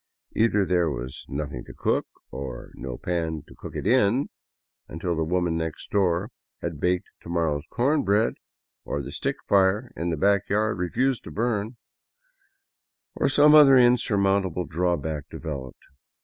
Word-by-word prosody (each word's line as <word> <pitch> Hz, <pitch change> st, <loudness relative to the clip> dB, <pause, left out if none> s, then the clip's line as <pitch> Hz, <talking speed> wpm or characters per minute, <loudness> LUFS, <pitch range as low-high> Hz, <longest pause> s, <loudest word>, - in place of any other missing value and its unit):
Either 110 Hz, -3 st, +3 dB
there 90 Hz, -3 st, +2 dB
was 65 Hz, -2 st, -6 dB
nothing 70 Hz, -3 st, -4 dB
to -, -, -12 dB
cook, -, -, 0 dB, 0.2 s
or 65 Hz, -2 st, -7 dB
no 65 Hz, -2 st, -6 dB
pan 80 Hz, -4 st, -2 dB
to -, -, -14 dB
cook -, -, -10 dB
it -, -, -4 dB
in, 125 Hz, +2 st, +3 dB, 0.6 s
until 85 Hz, +2 st, -3 dB
the 80 Hz, -, 0 dB
woman 85 Hz, 0 st, 0 dB
next 80 Hz, -1 st, -4 dB
door 95 Hz, +2 st, +1 dB, 0.3 s
had 85 Hz, -4 st, -5 dB
baked 90 Hz, +2 st, 0 dB
to -, -, -11 dB
morrow's 80 Hz, -4 st, 0 dB
corn 140 Hz, +5 st, +1 dB
bread, 105 Hz, +3 st, +2 dB, 0.5 s
or 70 Hz, -, -3 dB
the -, -, -7 dB
stick -, -, -2 dB
fire 100 Hz, +5 st, +3 dB
in 85 Hz, +1 st, -2 dB
the 80 Hz, -, -1 dB
back 100 Hz, +3 st, +2 dB
yard 105 Hz, 0 st, +1 dB
refused 125 Hz, +8 st, 0 dB
to -, -, -9 dB
burn, 115 Hz, 0 st, -2 dB, 1.4 s
or -, -, +1 dB
some 150 Hz, +1 st, +6 dB
other 145 Hz, -3 st, +8 dB
unsurmountable 100 Hz, -7 st, +2 dB
draw 90 Hz, +1 st, 0 dB
back 75 Hz, 0 st, -5 dB
developed. 70 Hz, -6 st, -7 dB
90 Hz, 155 wpm, -25 LUFS, 80-110 Hz, 1.4 s, other